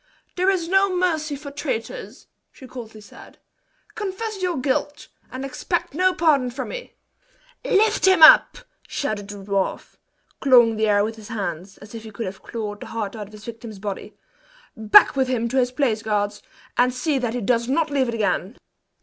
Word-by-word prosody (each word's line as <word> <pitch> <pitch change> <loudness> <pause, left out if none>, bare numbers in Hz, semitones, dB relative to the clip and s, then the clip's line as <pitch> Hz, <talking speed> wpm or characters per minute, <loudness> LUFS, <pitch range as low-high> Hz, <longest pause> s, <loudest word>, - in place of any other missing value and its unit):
"There 370 +2 +2
is 365 -4 0
no 385 +2 +3
mercy 330 -5 0
for 285 0 -9
traitors!" 250 -4 -5 0.3
she 265 - -14
coldly 225 -4 -10
said. 205 - -15 0.6
"Confess 415 0 -5
your 360 -4 -1
guilt, 285 +2 -2 0.2
and 260 +1 -5
expect 275 +6 -3
no 370 +4 +3
pardon 300 -7 +2
from 260 +2 -6
me!" - - -8 0.7
"Lift 440 -4 +2
him 375 -4 +5
up!" 310 - +8 0.3
shouted 215 -7 -3
the 205 - -8
dwarf, 195 -1 -3 0.4
clawing 240 -4 +5
the 220 0 +1
air 205 -1 +3
with 225 +1 -4
his 215 -2 -11
hands, 195 -3 -5
as 210 +2 -14
if 225 - -7
he 220 - -10
could 220 +2 -6
have 185 +1 -7
clawed 210 -3 -6
the - - -9
heart 220 -2 -4
out 210 -2 -7
of 215 - -18
his 210 0 -12
victim's 230 -2 -9
body; 195 0 -6 0.6
"back 220 +2 +6
with 265 -1 +1
him 240 -2 -1
to 265 - -2
his 250 -1 +2
place, 250 -5 0
guards, 205 -1 -2 0.4
and 250 +1 +3
see 280 +2 0
that 245 -2 -2
he 245 - -2
does 235 +2 +1
not 315 +2 +1
leave 270 -2 +1
it 235 - -3
again!" 210 0 -1
245 Hz, 185 wpm, -22 LUFS, 215-300 Hz, 0.7 s, up